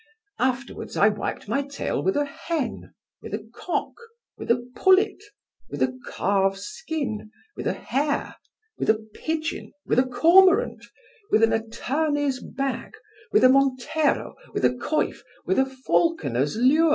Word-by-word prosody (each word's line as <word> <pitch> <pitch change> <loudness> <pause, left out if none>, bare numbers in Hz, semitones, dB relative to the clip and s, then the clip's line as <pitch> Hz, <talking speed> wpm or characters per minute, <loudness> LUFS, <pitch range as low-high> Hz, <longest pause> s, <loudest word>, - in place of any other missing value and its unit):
Afterwards 260 +1 -2
I 205 - +6
wiped 205 -1 -4
my 235 +7 +1
tail 280 0 -3
with 385 - +1
a 290 - +2
hen, 310 0 -4 0.3
with 210 - -5
a 215 +1 -8
cock, 345 +8 -3 0.4
with - - -9
a 240 +1 +1
pullet, 390 +2 +4 0.5
with 145 -2 -1
a 130 0 0 0.2
calf's 195 0 +1
skin, 280 -8 -4 0.3
with - - -4
a - - +1
hare, 285 +2 -2 0.4
with - - -1
a 220 - +6
pigeon, 310 +10 -4
with - - +2
a - - +5
cormorant, 345 +9 +5 0.5
with 220 - +4
an 225 - +4
attorney's 275 +5 -1
bag, 275 -1 -4 0.4
with - - +4
a 255 - +8
montero, 275 +3 +2 0.2
with - - +1
a - - +5
coif, 250 +5 -1 0.3
with 380 - +2
a 265 - +3
falconer's 260 - 0
lure. 285 +8 +4
265 Hz, 145 wpm, -25 LUFS, 220-315 Hz, 0.5 s, a